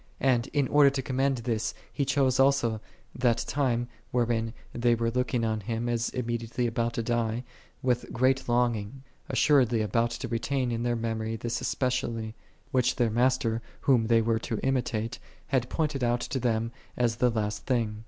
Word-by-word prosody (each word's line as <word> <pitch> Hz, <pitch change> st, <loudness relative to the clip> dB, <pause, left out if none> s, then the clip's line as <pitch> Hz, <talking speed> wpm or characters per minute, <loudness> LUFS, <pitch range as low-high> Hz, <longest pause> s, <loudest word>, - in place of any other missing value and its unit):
And 125 Hz, -2 st, +2 dB
in 145 Hz, -3 st, +1 dB
order 145 Hz, 0 st, +6 dB
to 135 Hz, -1 st, -2 dB
commend 135 Hz, +1 st, +1 dB
this 115 Hz, -2 st, -2 dB, 0.2 s
He 140 Hz, -, 0 dB
chose 135 Hz, -1 st, +2 dB
also 130 Hz, -5 st, +3 dB, 0.3 s
that 120 Hz, -2 st, +2 dB
time, 120 Hz, -4 st, 0 dB, 0.2 s
wherein 115 Hz, -2 st, 0 dB, 0.2 s
they 120 Hz, 0 st, +2 dB
were 115 Hz, 0 st, 0 dB
looking 125 Hz, -1 st, 0 dB
on 110 Hz, -1 st, 0 dB
Him, 115 Hz, +3 st, -3 dB
as 120 Hz, -1 st, 0 dB
immediately 120 Hz, 0 st, -2 dB
about 115 Hz, 0 st, 0 dB
to 115 Hz, -, -2 dB
die, 120 Hz, 0 st, 0 dB, 0.4 s
with 125 Hz, -1 st, 0 dB
great 130 Hz, +1 st, +1 dB
longing; 120 Hz, +1 st, 0 dB, 0.3 s
assuredly 125 Hz, -6 st, +4 dB
about 115 Hz, +3 st, +1 dB
to 120 Hz, +2 st, -5 dB
retain 120 Hz, +2 st, -1 dB
in 115 Hz, 0 st, -2 dB
their 120 Hz, 0 st, 0 dB
memory 115 Hz, -1 st, -2 dB
this 120 Hz, +1 st, -3 dB
especially, 120 Hz, -4 st, -1 dB, 0.4 s
which 130 Hz, -1 st, +2 dB
their 120 Hz, -3 st, +1 dB
Master, 120 Hz, -1 st, +1 dB, 0.2 s
Whom 120 Hz, -5 st, +3 dB
they 115 Hz, -1 st, +4 dB
were 115 Hz, 0 st, +1 dB
to 115 Hz, 0 st, -3 dB
imitate, 125 Hz, -3 st, -1 dB, 0.3 s
had 125 Hz, -3 st, +1 dB
pointed 150 Hz, -5 st, -1 dB
out 120 Hz, 0 st, +1 dB
to 135 Hz, -, -2 dB
them 115 Hz, -2 st, 0 dB, 0.3 s
as 115 Hz, -2 st, +1 dB
the 125 Hz, 0 st, +3 dB
last 105 Hz, -2 st, -2 dB
thing. 115 Hz, -5 st, 0 dB
120 Hz, 170 wpm, -28 LUFS, 115-130 Hz, 0.4 s, order